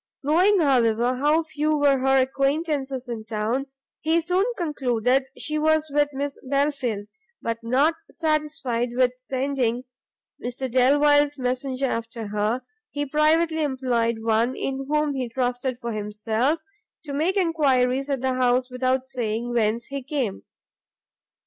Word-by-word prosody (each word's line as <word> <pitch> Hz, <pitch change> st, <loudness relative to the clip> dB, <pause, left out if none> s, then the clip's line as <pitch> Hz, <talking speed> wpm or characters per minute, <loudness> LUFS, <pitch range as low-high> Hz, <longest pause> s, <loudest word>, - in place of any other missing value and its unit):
Knowing, 365 Hz, +8 st, +4 dB
however, 245 Hz, -4 st, +2 dB
how 300 Hz, +4 st, +3 dB
few 310 Hz, -1 st, 0 dB
were 285 Hz, -2 st, +3 dB
her 270 Hz, +1 st, +3 dB
acquaintances 275 Hz, -1 st, -1 dB
in 230 Hz, -2 st, -5 dB
town, 225 Hz, +5 st, -2 dB, 0.3 s
he 320 Hz, +2 st, +2 dB
soon 360 Hz, +3 st, +1 dB
concluded 260 Hz, -, +1 dB
she 305 Hz, 0 st, -2 dB
was 315 Hz, 0 st, +2 dB
with 290 Hz, 0 st, +3 dB
Miss 280 Hz, +1 st, -4 dB
Belfield, 270 Hz, -6 st, -1 dB, 0.3 s
but, 230 Hz, 0 st, -3 dB
not 260 Hz, +8 st, +2 dB, 0.2 s
satisfied 300 Hz, -7 st, -1 dB
with 250 Hz, 0 st, +3 dB
sending 255 Hz, -2 st, -1 dB, 0.6 s
Mr 250 Hz, +1 st, -3 dB
Delvile's 290 Hz, +3 st, +4 dB
messenger 255 Hz, +1 st, -1 dB
after 230 Hz, -3 st, -4 dB
her, 210 Hz, +4 st, -1 dB, 0.3 s
he 290 Hz, 0 st, -3 dB
privately 315 Hz, +3 st, +2 dB
employed 250 Hz, -5 st, 0 dB
one 230 Hz, +3 st, +2 dB
in 270 Hz, 0 st, -3 dB
whom 300 Hz, -1 st, +1 dB
he 255 Hz, -3 st, -3 dB
trusted 250 Hz, +1 st, -1 dB
for 235 Hz, -2 st, -4 dB
himself, 220 Hz, +7 st, -1 dB, 0.5 s
to 285 Hz, -, -5 dB
make 330 Hz, +8 st, +1 dB
enquiries 275 Hz, -6 st, +2 dB
at 275 Hz, -3 st, -1 dB
the 260 Hz, 0 st, 0 dB
house 255 Hz, 0 st, +1 dB
without 255 Hz, +1 st, 0 dB
saying 240 Hz, -2 st, -2 dB
whence 230 Hz, 0 st, +1 dB
he 275 Hz, 0 st, -5 dB
came. 255 Hz, -7 st, -3 dB
265 Hz, 135 wpm, -24 LUFS, 245-295 Hz, 0.6 s, Knowing